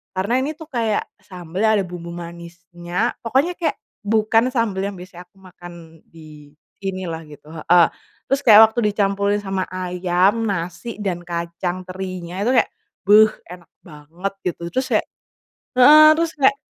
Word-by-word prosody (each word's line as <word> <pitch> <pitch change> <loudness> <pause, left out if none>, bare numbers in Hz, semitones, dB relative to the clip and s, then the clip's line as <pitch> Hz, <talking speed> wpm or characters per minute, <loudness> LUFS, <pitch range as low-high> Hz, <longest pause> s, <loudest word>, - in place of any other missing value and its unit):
karena 195 +6 -1
ini 290 +3 -2
tuh 320 - -11
kayak 225 -4 0 0.2
sambel 180 -1 -8
yang 220 0 +4
ada 190 - -2
bumbu 175 -1 -8
manisnya 175 +3 -5
pokoknya 270 +10 +1
kayak 315 -3 -1 0.3
bukan 220 +2 +2
sambel 225 -6 -1
yang 200 - -7
biasanya 180 -1 -11
aku 195 - -33
makan 175 -2 -13 0.4
di 155 -3 -15 0.3
sinilah 185 -4 -4
gitu, 150 0 -15
heeh, 170 +1 +4 0.4
terus 275 +1 0
kayak 220 -1 +9
waktu 240 - -3
dicampurin 200 0 0
sama 195 -1 -2
ayam, 185 +3 0
nasi, 180 +5 -5
dan 185 -4 -3
kacang 170 +2 -4
terinya 185 -1 -7
itu 240 +5 +1
kayak - - +3 0.4
beh 215 +1 +6 0.2
enak 175 -2 -15 0.2
banget 165 +5 -7
gitu 175 -1 -3
terus 260 0 -1
kayak, 215 - +2 0.7
heeh, 300 +4 +8
terus 335 0 0
kayak, 275 0 +4
185 Hz, 150 wpm, -20 LUFS, 175-220 Hz, 0.7 s, kayak